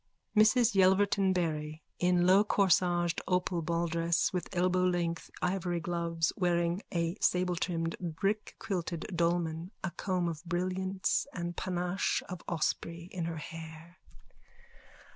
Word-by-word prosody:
MRS 225 +2 +5
YELVERTON 195 0 +4
BARRY: 155 -3 -2 0.2
_(In 180 0 +3
lowcorsaged 180 -3 +3
opal 180 -1 +1
balldress 170 0 0
and 180 - -1
elbowlength 180 -2 0
ivory 180 -1 0
gloves, 170 -1 -1
wearing 175 0 +1
a 170 -1 0
sabletrimmed 180 -3 0 0.2
brickquilted 195 -3 -2
dolman, 170 0 0
a 190 - -2
comb 180 0 -1
of 165 -1 -4
brilliants 185 +4 -1
and 175 -1 -4
panache 180 0 -1
of 180 -1 -6
osprey 170 +1 -2
in 175 -3 -3
her 165 -1 -4
hair.) 160 +2 -9
175 Hz, 105 wpm, -31 LUFS, 170-185 Hz, 0.2 s, MRS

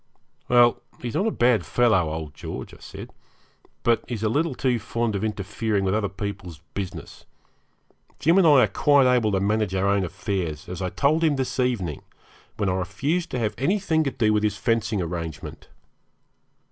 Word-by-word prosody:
'Well, 120 -1 +5 0.2
he's 120 -2 -5
not 205 - +1
a - - +3
bad 120 - +2
fellow, 110 -9 +2
old 80 -2 -5
George,' - - -7
I - - -12
said, - - -10 0.7
'but 115 -1 +2
he's 115 -3 -4
a 110 - +2
little 145 +4 0
too 125 -3 0
fond 115 0 -2
of 100 - -2
interfering 105 0 -1
with 95 0 +1
other 105 -2 0
people's 95 -5 -6
business. 90 -5 -7 0.9
Jim 170 +5 +4
and 180 - +5
I 140 -5 +7
are - - +3
quite 145 +2 +4
able 125 -4 +3
to 95 - +1
manage 105 0 0
our 95 +1 +1
own 100 0 +2
affairs, 85 -3 -3
as 90 +1 -6
I 90 - -1
told 150 - +1
him 155 -3 +3
this 130 -1 -3
evening, 110 - -1 0.6
when 105 - 0
I 90 - +1
refused 100 - -1
to - - -3
have 105 - -2
anything 165 +1 +1
to - - +1
do 110 -5 +1
with 105 - +2
his 105 -1 0
fencing 110 -4 0
arrangement.' 80 -2 -6
110 Hz, 185 wpm, -24 LUFS, 95-125 Hz, 0.9 s, I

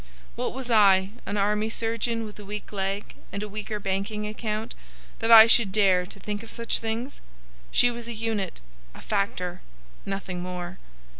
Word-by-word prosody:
What - - -2
was 260 -2 -4
I, 195 -3 +5 0.2
an 205 - -2
army 210 +2 +1
surgeon 230 0 -1
with 210 0 -10
a - - -8
weak 205 +1 -7
leg 195 +1 -3 0.2
and 200 - -4
a - - -4
weaker 210 +1 -5
banking 200 +2 -2
account, 215 +1 -4 0.5
that 225 - 0
I 225 -1 +12
should 225 -3 +5
dare 190 -3 +3
to 195 - -11
think 205 +1 -4
of 230 - -11
such 235 0 -2
things? 230 +4 -4 0.5
She 245 - +4
was 235 -1 -7
a 235 - -4
unit, 215 - -3 0.3
a - - -11
factor,—nothing 180 - -4
more. 180 0 -6
210 Hz, 165 wpm, -26 LUFS, 195-225 Hz, 0.5 s, I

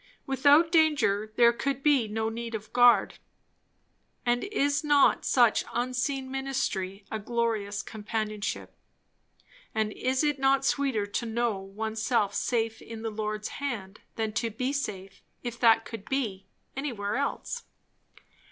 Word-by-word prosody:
Without 285 +5 +4
danger 280 - +3
there 235 -1 +6
could 275 +2 -2
be 280 -7 +4
no 220 +1 -2
need 230 0 -5
of 215 0 -8
guard; 245 0 +5 1.1
and 245 0 +1
is 290 -7 0
not 290 -2 +4
such 240 -4 +4
unseen 255 +2 -1
ministry 210 -8 -2
a 220 - -2
glorious 215 -2 -1
companionship? 215 -1 -4 1.0
and 215 -1 0
is 260 +3 0
it 295 -2 +1
not 270 0 +3
sweeter 270 -9 +1
to 205 +3 -3
know 225 -2 0
oneself 215 +2 -1
safe 225 0 -1
in 225 -1 -8
the 225 - -2
Lord's 215 0 -3
hand, 215 -9 -5 0.2
than 220 -1 -2
to 230 +1 -1
be 250 +5 -2
safe, 195 -8 -5 0.2
if 240 -1 -5
that 225 -1 +5
could 225 -4 -8
be, 220 -8 -2 0.3
anywhere 235 -8 -3
else? 280 - -3
235 Hz, 135 wpm, -28 LUFS, 215-270 Hz, 1.1 s, there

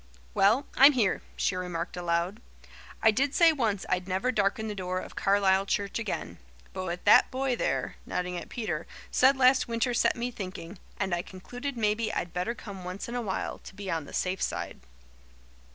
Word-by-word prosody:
"Well, 230 +8 +4
I'm 280 +2 +8
here," 225 -7 +1
she 185 - 0
remarked 180 -2 -4
aloud. 175 +4 -1 0.6
"I 220 - +7
did 270 +6 0
say 335 -1 +7
once 220 -9 -1
I'd 180 0 -1
never 190 +7 0
darken 215 0 0
the 210 - -3
door 185 -2 -3
of - - -6
Carlisle 195 -1 +3
church 200 +2 -1
again, 140 - -4 0.3
but 185 - -4
what 175 0 -5
that - - +7
boy 260 -1 0
there" - - -1
nodding 180 0 -3
at 175 - -6
Peter 185 - -3 0.2
"said 265 +2 +5
last 260 0 +5
winter 235 +1 0
set - - +3
me 245 0 -3
thinking, 185 -4 -7 0.2
and 190 -2 0
I 175 - +1
concluded 245 +10 -7
maybe 215 0 +1
I'd 175 - -3
better 180 +7 -2
come 195 -5 -9
once 180 +2 -5
in 235 - -6
a 245 - -1
while, 200 -5 -3
to - - -12
be 200 -1 -5
on 165 -3 -2
the - - -12
safe 185 +1 -1
side." - - -3
200 Hz, 190 wpm, -28 LUFS, 180-240 Hz, 0.6 s, I'm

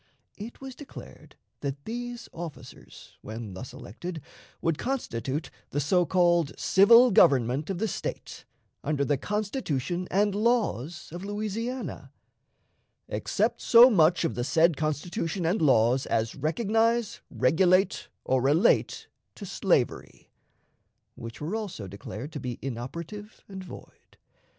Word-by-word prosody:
It 220 +3 -9
was 270 -1 -8
declared 285 +2 -12 0.2
that 140 0 -5
these 240 0 -6
officers, 165 -3 -10
when 110 -2 -7
thus 95 +7 -8
elected, 170 - -7 0.4
would 165 -2 -1
constitute 150 - -3 0.2
the 145 - -2
so 175 +4 +2
called 175 -4 +2
civil 230 +6 +6
government 135 - +4
of 195 - -2
the 220 +5 -1
State, - - -6 0.4
under 145 -1 0
the 145 - +2
Constitution 185 - -2
and 205 +2 +2
laws 200 - 0
of 175 +3 -7
Louisiana, 215 +5 -4 1.0
"except - - -1
so 245 +2 +8
much 170 -3 +4
of 165 - -1
the 120 - -2
said 165 +4 +3
Constitution 165 +4 -2
and 175 +5 +1
laws 130 -2 +3
as 110 0 0
recognize, 225 +7 0
regulate, 185 +7 +2 0.2
or 130 -1 +2
relate 145 +6 +2 0.3
to - - -8
slavery," - - -1 0.8
which 115 0 -9
were 160 +8 -3
also 205 - -5
declared 105 - -8
to 150 - -6
be 125 -2 -5
inoperative 165 - -7
and 190 -1 -8
void. 180 - -14
175 Hz, 125 wpm, -27 LUFS, 140-210 Hz, 1.0 s, so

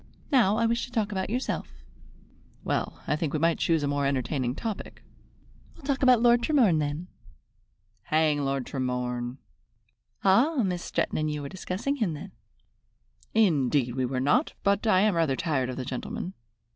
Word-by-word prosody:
Now 220 -7 +4
I 230 - +2
wish 235 +1 +1
to - - -15
talk 215 -3 -1
about 190 -1 -2
yourself." 250 +4 -2 0.9
"Well, - - -2
I - - +1
think 155 -2 -2
we 155 - 0
might 165 +1 +2
choose 165 -3 +2
a - - +1
more 140 0 0
entertaining 130 -2 -1
topic." 220 +2 -6 0.7
"We'll - - -17
talk 280 0 0
about 250 -3 +5
Lord 240 0 +5
Tremorne 235 - +3
then." 150 +4 -3 1.0
"Hang 155 -2 +2
Lord 135 -2 -1
Tremorne!" 125 -2 -3 0.9
"Ah, 245 +8 +4
Miss 180 -2 -2
Stretton - - -1
and 155 0 0
you 150 -1 -3
were 140 - -5
discussing 190 +9 -3
him 195 - 0
then?" - - -9 1.0
"Indeed 145 - +3
we 130 0 0
were 130 0 -2
not, 150 - +2
but 200 +2 +2
I 185 -3 +5
am 210 0 +3
rather 165 -5 +1
tired 135 -5 -1
of 130 - -5
the 130 - -4
gentleman. 135 +8 -5
165 Hz, 170 wpm, -27 LUFS, 140-220 Hz, 1.0 s, about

